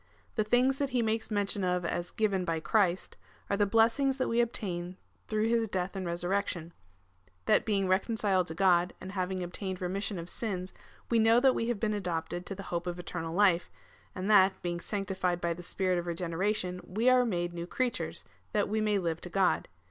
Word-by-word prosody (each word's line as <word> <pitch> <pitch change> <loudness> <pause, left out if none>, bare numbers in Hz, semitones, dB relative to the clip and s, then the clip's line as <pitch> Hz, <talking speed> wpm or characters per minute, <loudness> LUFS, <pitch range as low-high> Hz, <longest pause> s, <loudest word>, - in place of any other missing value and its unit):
The 215 - +1
things 250 +5 +2
that 280 -1 0
he 245 -2 +1
makes 220 0 -1
mention 205 -2 0
of 180 -1 0
as 175 +1 -2
given 200 -5 0
by 165 -2 -1
Christ 185 0 +1 0.3
are - - +3
the 205 0 +3
blessings 230 +6 +3
that 260 - 0
we 235 +1 +3
obtain 185 -6 -3 0.3
through 215 0 +1
his 230 -1 +2
death 190 -1 -2
and 190 -2 -3
resurrection 175 -1 -2 0.3
— 90 0 -37
that - - +3
being 200 -3 +1
reconciled 190 -1 +1
to 160 - -5
God, 180 -1 +3
and 190 - -7
having 185 -1 -2
obtained 185 +1 -5
remission 195 +2 -2
of 170 0 -6
sins, 185 -2 -4 0.4
we 230 - +4
know 225 +1 +6
that 265 -1 +5
w^e 230 - -1
have 240 -4 -1
been 215 -1 0
adopted 175 -2 -3
to 195 - -5
the 195 - -7
hope 170 +1 -2
of 175 0 -3
eternal 170 -2 -5
life, 185 -3 +3 0.5
and 185 +1 -3
that, 195 -2 +5
being 175 -1 -2
sanctified 190 -2 -2
by 170 -1 0
the 175 - -9
Sj)irit 180 0 0
of 175 - -5
regeneration, 180 +2 -1
we 220 +6 -1
are 255 0 +6
made 175 -6 -1
new 170 0 -5
creatures, 250 +5 -2 0.3
that 205 -1 +2
we 215 +2 0
may 210 -1 +2
live 165 -3 -2
to 180 - -7
God. 190 +1 +2
190 Hz, 200 wpm, -30 LUFS, 175-215 Hz, 0.5 s, know